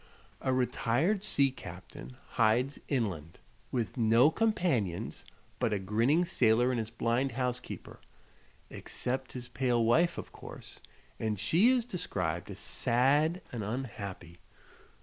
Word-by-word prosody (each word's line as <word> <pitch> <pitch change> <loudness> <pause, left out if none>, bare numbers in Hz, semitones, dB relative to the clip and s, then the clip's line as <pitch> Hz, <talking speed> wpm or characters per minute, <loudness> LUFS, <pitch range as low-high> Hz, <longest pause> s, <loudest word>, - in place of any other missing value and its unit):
A 130 - 0
retired 130 - +1
sea 140 -9 +3
captain 85 - -10
hides 120 +5 +2
inland, 95 - -2 0.3
with 120 0 -2
no 115 +5 +5
companions 165 - 0 0.4
but 110 - +1
a - - +1
grinning 115 - +2
sailor 120 -5 +3
and 125 - 0
his 110 -1 -3
blind 120 +3 0
housekeeper 125 0 -4 0.7
except 130 +1 -3
his 125 -1 -6
pale 120 -2 +1
wife, 170 +9 +3
of - - -7
course; - - -11 0.4
and 110 -3 -1
she 165 - +4
is 255 -3 +2
described 90 - -2
as - - -7
sad 145 +8 +2
and 120 -5 -4
unhappy. 100 -7 -6
120 Hz, 125 wpm, -31 LUFS, 110-140 Hz, 0.7 s, no